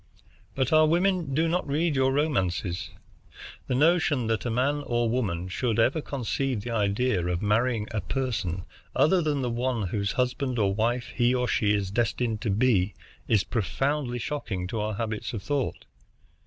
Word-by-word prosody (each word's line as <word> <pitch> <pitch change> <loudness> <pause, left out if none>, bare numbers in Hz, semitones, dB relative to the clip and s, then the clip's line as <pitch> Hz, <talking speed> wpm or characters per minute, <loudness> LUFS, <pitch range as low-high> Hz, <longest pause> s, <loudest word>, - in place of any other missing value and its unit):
But 130 +1 0
our 155 0 +6
women 175 -3 +1
do 160 +2 +2
not 175 -1 0
read 150 +2 +1
your 130 0 +3
romances. 95 - 0 0.8
The 125 - 0
notion 150 -3 +3
that 110 +2 -1
a - - 0
man 135 +5 +1
or 120 -1 +1
woman 100 -8 -1
should, 115 +4 -1
ever 130 +7 +3
conceive 135 -3 -2
the 120 - -5
idea 105 -1 +1
of 90 +1 -1
marrying 110 +1 +1
a 110 -2 -1
person 105 -10 -2 0.3
other 175 +4 +4
than 145 -4 0
the 125 - -1
one 120 -4 -1
whose 100 0 -1
husband 125 0 -1
or 100 -3 +2
wife 115 +2 -1
he 120 +1 +3
or 125 0 0
she 105 -1 +2
is 100 -2 -2
destined 115 0 0
to 115 - -1
be 105 -2 +2 0.3
is 105 -4 +3
profoundly 130 +4 -1
shocking 115 -8 -3
to 115 - -2
our 105 0 -2
habits 110 +1 -3
of 105 -4 -5
thought. 140 +2 -2
120 Hz, 170 wpm, -27 LUFS, 105-135 Hz, 0.8 s, our